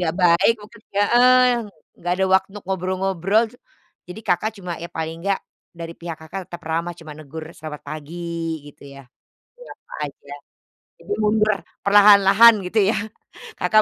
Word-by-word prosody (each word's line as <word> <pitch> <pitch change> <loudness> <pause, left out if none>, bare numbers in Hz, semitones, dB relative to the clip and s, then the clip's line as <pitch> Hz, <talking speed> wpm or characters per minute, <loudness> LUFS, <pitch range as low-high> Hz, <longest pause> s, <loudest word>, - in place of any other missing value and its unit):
nggak 175 0 -1
baik, 170 +6 +5
mungkin 210 +1 -15
heeh, 245 +5 +4 0.5
nggak 175 +1 -1
ada 190 - +1
waktu 195 +2 +1
ngobrol-ngobrol, 190 +2 0
cu - - -17 0.5
jadi 195 +5 -8
Kakak 205 +4 0
cuma 180 -2 -5
ya 170 - -6
paling 160 +1 -5
enggak, 195 +1 0 0.4
dari 165 0 -7
pihak 170 -2 -6
Kakak 180 +4 -8
tetap 175 -1 -10
ramah, 170 +1 -2
cuma 155 -2 -10
negur 155 +1 -9
selamat 150 -1 -9
pagi, 155 +2 -8 0.5
gitu 145 - -15
ya. 140 -1 -13 0.7
Menyapa - - -17
aja. 140 0 -13 0.7
Jadi 415 - -5
mundur 215 0 +3 0.3
perlahan-lahan, 205 +2 +7
gitu 215 +4 0
ya. 220 - +1 0.6
Kakak 215 +4 +4
180 Hz, 150 wpm, -21 LUFS, 165-210 Hz, 0.7 s, perlahan-lahan